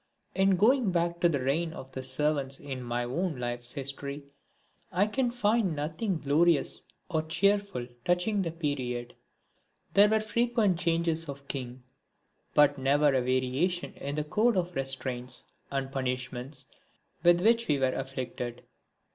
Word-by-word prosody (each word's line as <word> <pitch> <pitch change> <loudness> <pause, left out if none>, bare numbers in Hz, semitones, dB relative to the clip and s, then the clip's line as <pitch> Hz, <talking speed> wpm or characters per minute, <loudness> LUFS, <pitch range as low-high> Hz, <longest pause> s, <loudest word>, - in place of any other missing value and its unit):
In 195 0 +4
going 230 +2 +4
back 170 0 0
to 175 - +4
the 145 -4 0
reign 160 +5 0
of 135 -5 -9
the 130 - -5
servants 135 0 0
in 135 -3 -6
my 120 0 -2
own 160 +7 -1
life's 120 0 -3
history 140 +1 -5 0.7
I 185 +3 +3
can 245 +4 0
find 215 -6 +1
nothing 160 +6 -2
glorious 155 +2 +2 0.2
or 160 -4 0
cheerful 200 -1 +1 0.2
touching 180 +5 +1
the 175 - -1
period. 130 -7 -3 0.8
There 205 +1 +7
were 220 0 +3
frequent 220 -4 +1
changes 165 -2 0
of 140 0 -8
king, 125 -2 -5 0.7
but 145 -1 +5
never 145 +3 +4
a 130 - +3
variation 130 +8 0
in 140 +1 -5
the 150 - 0
code 215 +8 +2
of 180 -1 -1
restraints 130 -2 -2 0.2
and 135 -1 -2
punishments 130 +1 -3 0.6
with 175 0 +5
which 230 +3 +3
we 150 - +3
were 130 -1 +1
afflicted. 125 -2 -5
150 Hz, 145 wpm, -29 LUFS, 130-180 Hz, 0.8 s, There